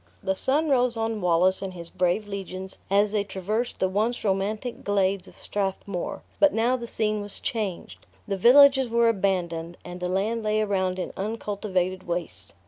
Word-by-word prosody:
The 190 - 0
sun 290 +10 +1
rose 250 -3 +2
on 225 -1 -1
Wallace 180 +2 +3
and 190 -2 -5
his 170 -1 -8
brave 180 +4 0
legions 190 -1 -6
as 200 +1 +3
they 210 -1 +1
traversed 205 +5 -3
the 190 - +2
once 215 +6 -1
romantic 210 +4 -1
glades 195 -2 +1
of - - -16
Strathmore; 195 -2 -3 0.2
but 295 -1 +5
now 235 +3 +2
the 235 -2 -5
scene 215 -2 0
was 205 -1 -5
changed. 215 -9 -4 0.2
The 200 - -1
villages 265 +5 +6
were 235 0 +4
abandoned, 175 -5 -1
and 180 0 -7
the 180 0 -2
land 210 +5 0
lay 215 0 +1
around 190 -3 0
in 185 - -4
uncultivated 195 -3 -2
wastes. 160 - -4
200 Hz, 170 wpm, -26 LUFS, 185-225 Hz, 0.2 s, villages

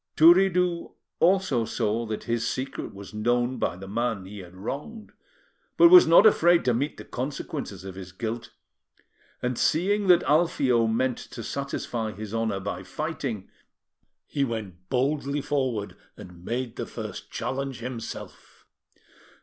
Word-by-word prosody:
Turiddu 180 +1 +4 0.3
also 175 -9 +3
saw 115 0 -1
that 110 -1 -4
his 115 -1 -1
secret 130 +1 -4
was 100 +2 -11
known 120 +4 0
by - - 0
the 95 +2 -10
man 110 -2 -2
he 100 +2 -9
had 90 -1 -11
wronged, 145 - -6 0.7
but 340 - +8
was 360 -1 +10
not 165 - +7
afraid 175 -5 +5
to 125 - +3
meet 140 +6 -1
the - - -9
consequences 130 - -5
of 95 -1 -7
his 90 -1 -9
guilt; 115 +3 -5 0.9
and 125 -1 -1
seeing 200 +5 +2
that 180 -1 +6
Alfio 135 -7 +3
meant 125 +2 0
to 115 - -9
satisfy 120 -5 -3
his 110 0 -7
honour 110 -3 -1
by 100 +1 -4
fighting, 135 - -4 0.8
he 140 - -1
went 100 -8 -5
boldly 140 +2 0
forward 130 -8 -2 0.2
and 90 -1 -12
made 120 +2 -3
the - - -4
first - - -7
challenge 135 -1 -3
himself. 120 -1 -8
120 Hz, 140 wpm, -26 LUFS, 110-145 Hz, 0.9 s, was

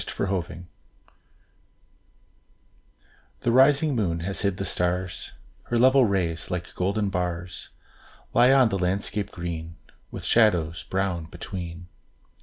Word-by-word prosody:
ENDYMION 90 -3 -3 2.7
The 120 - +1
rising 140 +4 +5
moon 85 -7 0
has 95 +3 -3
hid 100 -2 0
the 100 - -3
stars; 90 0 -2 0.3
Her 120 - -1
level 130 +2 +6
rays, 90 -6 -1
like 90 -1 -4
golden 100 +3 0
bars, 90 -1 -4 0.6
Lie 125 +2 +6
on 130 -3 +5
the 100 -2 -1
landscape 100 +2 -1
green, 85 -1 -6 0.3
With - - -8
shadows 90 -8 +3
brown 95 -3 -1
between. 85 +1 -7
95 Hz, 110 wpm, -25 LUFS, 85-105 Hz, 2.7 s, level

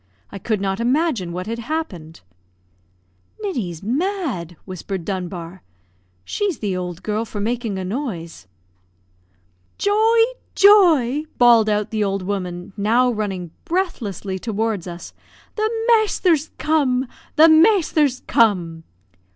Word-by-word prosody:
I 200 - -7
could 215 +2 -1
not 195 0 -2
imagine 245 - 0
what 180 +1 -5
had 230 +2 -4
happened. 225 - -5 1.2
"Ninny's 220 - -4
mad!" 260 - -2
whispered 185 -1 -6
Dunbar; 180 -1 -5 0.6
"she's 405 -6 -2
the 200 -4 -2
old 180 0 -5
girl 215 +1 -1
for 215 -2 -7
making 225 -1 -2
a 190 - -4
noise." 180 - -5 1.3
"Joy! 435 +3 +2 0.4
Joy!" 320 - +5
bawled 235 -3 +5
out 210 0 0
the 215 -1 0
old 195 -1 -1
woman, 180 -1 -4
now 230 +5 +2
running 195 -6 -4
breathlessly 220 - -3
toward 220 -3 -2
us. 175 0 -8 0.4
"The 435 0 0 0.2
masther's 400 - +2
come 275 -5 +1 0.3
the 315 +2 +7
masther's 315 - +4
come!" 175 -8 +1
220 Hz, 115 wpm, -21 LUFS, 185-305 Hz, 1.3 s, the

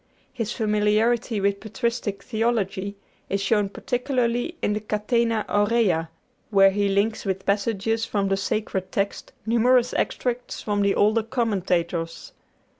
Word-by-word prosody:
His 230 -3 -3
familiarity 215 +1 +1
with 200 0 +1
patristic 220 -2 -3
theology 215 -4 -1 0.3
is 200 - 0
shown 200 0 +1
particularly 250 - -1
in 210 - 0
the 210 - -1
'Catena 215 +1 0
Aurea,' 205 -6 +2 0.4
where 195 -2 +6
he 200 0 +1
links 205 +3 +1
with 190 -1 -3
passages 220 +2 0
from 200 -3 0
the 195 - +2
Sacred 195 -2 -2
Text 200 0 -2
numerous 240 +2 +3
extracts 245 0 -2
from 205 -1 -1
the 200 0 +2
older 215 +2 +3
commentators. 180 -8 -1
210 Hz, 125 wpm, -24 LUFS, 195-230 Hz, 0.4 s, where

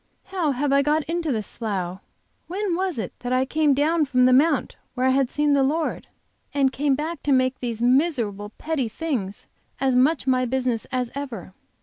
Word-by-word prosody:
How 345 -7 -1
have 275 +2 0
I 280 - +5
got 300 +2 +1
into 330 -1 -2
this 215 -4 -1
slough? 190 -5 -3 0.5
When 385 +1 -2
was 370 -3 -1
it 210 -6 -4
that 245 0 -4
I 255 +1 +2
came 300 0 +2
down 310 +3 +2
from 255 -2 +3
the 255 - +5
Mount 290 +2 +3 0.2
where 255 0 0
I 260 - +4
had 265 -1 +2
seen 295 0 +1
the 280 - +4
Lord, 305 +4 -1 0.5
and 270 -2 +3
came 280 -1 +1
back 315 +4 -4
to 290 - -1
make 255 -1 +2
these 235 -2 -3
miserable, 245 - +1
petty 300 -7 -2
things 225 -8 -3 0.3
as 265 -1 +2
much 265 +4 +3
my 255 -1 +2
business 250 -2 -1
as 250 -2 -1
ever? 245 -10 -6
265 Hz, 195 wpm, -24 LUFS, 250-300 Hz, 0.5 s, I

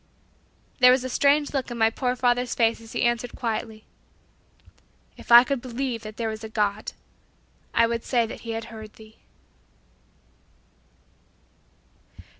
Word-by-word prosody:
There 250 -1 +8
was 255 0 +2
a 255 - -4
strange 285 +3 +2
look 270 -3 -2
in 240 - -6
my 225 -1 +3
poor 250 +1 -1
father's 245 0 0
face 230 -1 +1
as 225 0 -13
he 240 - -1
answered 240 0 -1
quietly, 225 -2 -4 1.3
"If - - -11
I 240 +1 +10
could 275 -1 -2
believe 250 -1 -4
that 215 -1 -10
there 230 - -2
was 220 0 -5
a 220 - -6
God, 210 -1 -2 0.8
I 230 - +4
would 230 0 -2
say 240 -3 +1
that 225 - -8
He 230 -1 -6
had 225 0 -4
heard 220 -1 -10
thee." 220 0 -17
235 Hz, 150 wpm, -25 LUFS, 225-250 Hz, 1.3 s, I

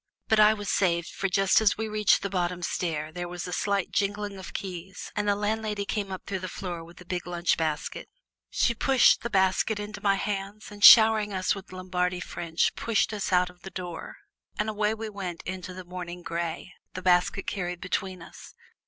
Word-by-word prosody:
But 220 - +4
I 215 +1 +7
was 205 -1 -7
saved, 170 -3 +1
for 195 - -2
just 195 +3 +4
as 215 - +3
we 220 0 -2
reached 215 -1 +2
the 200 - -1
bottom 180 -1 -1
stair 155 -3 -2
there 175 +2 -5
was 175 0 -6
a 180 - -5
slight 200 0 0
jingling 205 0 -1
of 185 -2 -8
keys, 185 0 -6
and 210 0 -1
the 205 - +3
landlady 210 0 -2
came 200 -1 -3
up 190 - -6
through 190 - -3
the 185 - -5
floor 175 -3 -5
with 170 +1 -15
a - - -13
big 180 0 -4
lunch 175 0 +1
basket. 155 -2 -3 0.4
She 235 - +2
pushed 260 +2 +4
the 235 - -3
basket 190 +1 +2
into 205 0 -6
my 200 -1 +3
hands 200 +1 -4
and 205 0 -8
showering 220 -2 +8
us 185 -1 +1
with 195 -1 -9
Lombardy 180 -1 -2
French 170 -2 -1
pushed 225 -1 0
us 205 -2 -3
out 180 0 +3
of 180 0 -25
the 190 - -8
door, 180 -3 -7 0.4
and 210 +1 0
away 215 0 0
we 225 0 -5
went 190 -5 -6
into 185 0 -6
the 185 0 -9
morning 175 -1 -7
gray, 170 +1 -4 0.2
the 185 - -5
basket 180 +2 +2
carried 180 -3 -3
between 185 -1 -3
us. - - -13
190 Hz, 205 wpm, -27 LUFS, 180-205 Hz, 0.4 s, showering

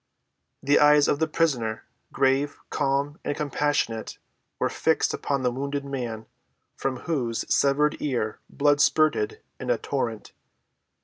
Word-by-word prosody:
The 145 +1 +4
eyes 150 0 +6
of 145 - +1
the 160 - +2
prisoner, 125 -9 0 0.3
grave, 135 +2 +1
calm, 140 +1 0
and 145 - -2
compassionate, 145 -5 -1 0.4
were - - +1
fixed - - +1
upon 140 -2 -2
the 125 - +2
wounded 140 +2 -3
man, 120 -5 -4 0.5
from 130 -2 -3
whose 125 -8 -2
severed 145 +2 +2
ear 120 -7 -2
blood 145 0 +2
spurted 415 - +2 0.2
in - - -5
a - - +3
torrent. - - -3
140 Hz, 130 wpm, -25 LUFS, 130-150 Hz, 0.5 s, eyes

